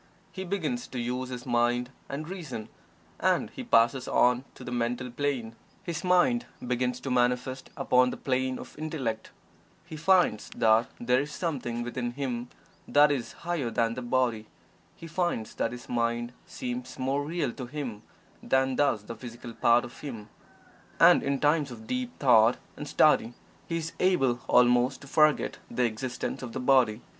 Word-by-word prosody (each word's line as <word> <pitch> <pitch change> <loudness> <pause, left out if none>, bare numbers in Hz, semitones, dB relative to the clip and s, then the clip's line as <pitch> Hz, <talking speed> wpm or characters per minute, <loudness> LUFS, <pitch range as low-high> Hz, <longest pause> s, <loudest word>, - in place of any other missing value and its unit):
He 190 - -6
begins 200 +6 -2
to 125 - -5
use 125 +2 -2
his 125 -1 -6
mind 120 0 +1 0.2
and 150 +3 -5
reason, 150 - -6 0.5
and - - +1
he - - -7
passes 120 +3 +3
on 125 +1 +3
to - - -11
the 125 - -6
Mental 125 +1 -2
Plane 120 -4 -2 0.3
his 170 -4 -4
mind 180 +7 +3 0.2
begins 125 0 -1
to 135 - -4
manifest 125 +1 0
upon 125 0 +4
the - - -5
plane 130 -1 -1
of - - -10
Intellect. 135 -8 -3 0.6
He 165 -2 -8
finds 165 - +3
that 110 +1 +4
there 125 +2 +2
is 145 +1 -5
something 130 -9 -3
within 120 0 -3
him 125 -3 -3 0.4
that 145 0 +5
is 125 -5 -2
higher 170 -8 -1
than 115 0 +1
the 125 - -5
body. 120 -3 0 0.5
He - - -11
finds 165 -9 -2
that 115 - -1
his 125 0 -9
mind 120 0 -1
seems 125 +1 -5
more 135 +2 0
real 160 -3 -2
to 125 0 -7
him 125 -6 -5 0.4
than 130 0 +1
does 135 -8 +2
the 115 - -7
physical 120 0 -9
part 120 +1 +3
of 120 - -12
him, 115 -8 -7 0.7
and - - +7
in 140 0 -1
times 150 -1 +2
of 115 -3 -10
deep 250 - -3
thought 120 -3 +5 0.2
and 145 - -7
study 120 -6 +3 0.3
he 165 - -1
is 165 0 -4
able 135 -10 +2
almost 125 +1 +4
to 140 - -12
forget 155 +1 +3
the 125 - 0
existence 120 +2 -3
of 120 -3 -7
the - - -3
body. 125 -4 +3
125 Hz, 170 wpm, -28 LUFS, 120-145 Hz, 0.7 s, and